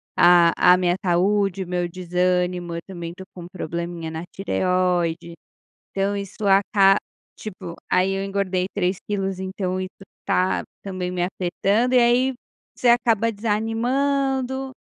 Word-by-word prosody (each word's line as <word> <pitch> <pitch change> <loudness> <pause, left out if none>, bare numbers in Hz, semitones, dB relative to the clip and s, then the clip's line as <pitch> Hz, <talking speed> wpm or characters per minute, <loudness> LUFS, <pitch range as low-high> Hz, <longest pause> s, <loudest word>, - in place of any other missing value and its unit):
a 175 -1 +6 0.2
a - - +4
minha 180 -1 +1
saúde, 195 +2 +1
o - - -11
meu 180 0 -1
desânimo, 180 0 -1
eu - - -3
também 175 -3 -6
estou 190 +2 -11
com 175 -2 -9
probleminha 170 -1 -5
na 160 +1 -5
tireoide, 180 -3 0 0.6
então 195 +1 -1
isso 200 +1 -5
aca 195 0 +4 0.4
tipo, 185 -5 -8 0.2
aí 185 +1 +3
eu 195 0 -2
engordei 195 -2 -1
3 185 -2 0
quilos, 195 -2 -2
então 190 -1 -3
isso 185 - -4 0.3
está 185 +1 0 0.2
também 185 -2 -4
me 180 -1 -1
afetando, 195 +7 0
e - - +7
aí 245 +2 +3 0.4
você 245 - +2
acaba 230 -2 +3
desanimando. 260 +5 -1
190 Hz, 140 wpm, -22 LUFS, 180-205 Hz, 0.6 s, e